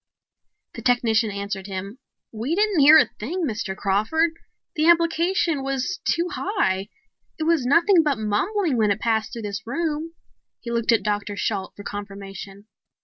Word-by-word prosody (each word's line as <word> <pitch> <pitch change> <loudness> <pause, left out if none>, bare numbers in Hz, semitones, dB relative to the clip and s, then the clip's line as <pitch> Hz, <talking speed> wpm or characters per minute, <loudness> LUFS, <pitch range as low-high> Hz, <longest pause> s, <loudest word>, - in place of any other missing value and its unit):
The - - -8
technician 230 -2 +2
answered 200 -1 -5
him. 195 +5 -6 0.3
"We 235 +9 -2
didn't 415 -3 +2
hear 295 +3 +9
a 250 - +3
thing, 330 - -2
Mr. 210 -6 -3
Crawford. 215 +13 +1 0.4
The 310 0 +2
amplification 335 -2 +2
was 270 +6 -2
too 340 +1 +1
high. 210 - -1 0.5
It 315 - -3
was 315 -6 +2
nothing 335 +5 +5
but 295 -5 0
mumbling 270 - 0
when 215 -2 +3
it 200 +1 0
passed 220 -1 0
through 230 -2 -7
this 205 +1 -5
room." 320 +4 -3 0.4
He 235 - -7
looked 235 -1 +1
at 230 - +2
Dr. 205 -1 -2
Shalt 200 -2 -2
for 205 - -10
confirmation. 200 -1 -8
235 Hz, 155 wpm, -23 LUFS, 205-330 Hz, 0.5 s, hear